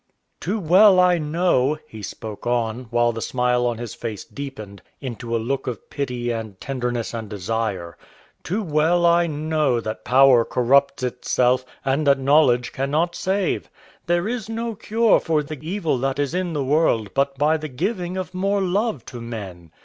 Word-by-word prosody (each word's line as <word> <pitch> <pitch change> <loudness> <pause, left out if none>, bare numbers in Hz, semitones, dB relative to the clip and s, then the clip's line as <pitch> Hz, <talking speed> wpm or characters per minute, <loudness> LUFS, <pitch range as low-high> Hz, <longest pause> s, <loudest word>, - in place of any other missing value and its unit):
"Too 200 +7 -2
well 190 +2 +6
I 180 -1 +4
know," 155 -3 +1
he 110 - -10
spoke 110 +2 -7
on, 120 0 -1
while 120 0 +2
the 115 0 -6
smile 125 0 +1
on 120 -1 -2
his 120 -1 -6
face 110 -4 -6
deepened 110 -8 -8 0.2
into 120 -3 -4
a - - +3
look 135 +5 -2
of 120 -5 -6
pity 125 -3 -2
and 110 -4 -5
tenderness 125 -3 -3
and 110 -2 -5
desire, 100 -3 -3 0.4
"too 205 +6 -2
well 165 +1 +2
I 170 0 +4
know 155 -4 0
that 110 -1 -5
power 130 -2 +6
corrupts 140 +3 +2
itself 125 0 +1 0.2
and 140 +3 +1
that 140 0 +5
knowledge 135 -3 +3
cannot 150 +6 0
save. 185 +1 -1 0.4
There 175 +2 +1
is 230 -2 -4
no 230 +1 -3
cure 225 +2 +2
for 155 -3 0
the 145 0 -7
evil 165 -4 -1
that 135 +1 -1
is 145 +1 -1
in 180 -2 -1
the 145 -2 -1
world 130 -7 +1
but 140 0 0
by 150 +3 +3
the 155 -1 -6
giving 180 - -3
of 185 0 -5
more 195 +2 0
love 195 - -1
to 120 - -8
men. 100 -8 -7
140 Hz, 170 wpm, -22 LUFS, 120-170 Hz, 0.4 s, well